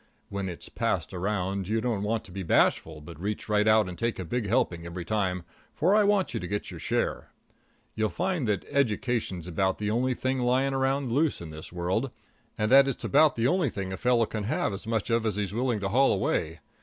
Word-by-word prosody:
When 100 -1 -3
it's 85 - -7
passed - - -2
around 95 0 -2
you 110 +2 +1
don't 110 -4 -1
want 110 +2 -1
to 95 - -14
be 95 +2 -5
bashful, 80 -2 +2
but 80 +1 -11
reach 105 +2 -3
right 105 0 +2
out 110 -2 +5
and 90 - -7
take 115 0 -1
a 95 - -4
big 115 +5 -2
helping 85 -5 +1
every 85 0 -6
time, 95 -4 -1 0.3
for 175 +6 +3
I 210 0 +5
want 200 -2 +2
you - - -1
to 90 - -5
get 105 +2 -3
your - - -8
share. - - -1 0.6
You'll 110 0 0
find 180 -8 -1
that 100 -4 0
education's 115 - 0
about 95 +2 0
the 105 0 -2
only 125 +3 +1
thing 130 +1 -1
lying 130 +2 +2
around 135 -1 0
loose 150 +4 +1
in 85 -2 -8
this 80 0 -9
world, 90 +9 -1 0.5
and 105 +1 0
that 135 +1 +8
it's 135 - -2
about 150 +2 +4
the 115 - 0
only 165 +1 +2
thing 95 -3 -4
a - - -2
fellow 120 0 +3
can 105 -1 -4
have 105 - 0
as 95 - -7
much 115 0 -1
of 115 -1 +2
as 110 -3 0
he's 100 -2 -2
willing 120 -1 0
to 100 - -1
haul 135 +6 +4
away. 80 -5 -1
110 Hz, 225 wpm, -27 LUFS, 95-125 Hz, 0.6 s, that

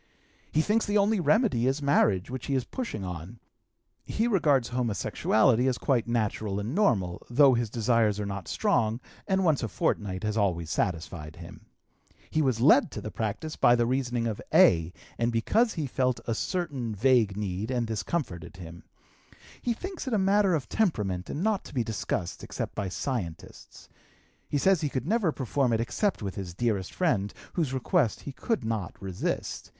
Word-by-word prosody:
He 155 - +3
thinks 220 +4 +1
the 205 +1 +2
only 205 +1 +3
remedy 185 - +2
is 135 +2 +1
marriage, 125 -8 +2
which 130 -2 -5
he 140 - 0
is 130 - +1
pushing 235 - -5
on. 90 +5 -7 0.6
He 225 +2 -1
regards 145 - +2
homosexuality 120 0 +2
as 130 -2 +1
quite 125 -6 +1
natural 110 -3 -1
and 105 +5 -4
normal, 100 - +1
though 135 +2 +6
his 120 -2 0
desires 115 -2 +2
are 105 - -2
not 100 -2 -5
strong, 115 -1 +1 0.3
and 190 -1 +2
once 155 -5 +3
a 115 - -1
fortnight 95 -2 -1
has 105 0 -1
always 85 -6 0
satisfied 80 -4 -2
him. - - -12 0.6
He 155 - +2
was 130 -6 +1
led 145 +2 +6
to - - -5
the 110 - -6
practice 110 +9 -3
by 120 - +5
the 120 -1 +2
reasoning 125 -2 0
of 110 -3 -3
A., 80 0 +5 0.3
and 120 0 +1
because 215 - +2
he 155 - -2
felt 130 -1 0
a 115 - -1
certain 140 - -2
vague 115 -3 +3
need, 100 +1 -3
and 125 -2 0
this 110 -2 -2
comforted 95 - -4
him. 85 -2 -10 0.8
He 240 - 0
thinks 370 - -6
it 245 - +1
a - - +3
matter 195 -1 +3
of 145 -5 -3
temperament 105 - -1
and 155 - -3
not 215 -2 +1
to - - -11
be 120 - +2
discussed, 100 -5 -3
except - - -5
by 100 -3 -3
scientists. 90 - -5 0.6
He 145 - 0
says 190 +3 +3
he 150 - 0
could 130 -2 -3
never 205 -2 +2
perform 130 -1 0
it 110 - +1
except 175 - -1
with 95 -2 -3
his 90 -3 -6
dearest 105 -4 -1
friend, 105 - 0 0.2
whose 160 -7 0
request 130 - +1
he 140 - -6
could 225 - -2
not 110 -6 -3
resist. 95 -2 -3
120 Hz, 180 wpm, -28 LUFS, 100-150 Hz, 0.8 s, though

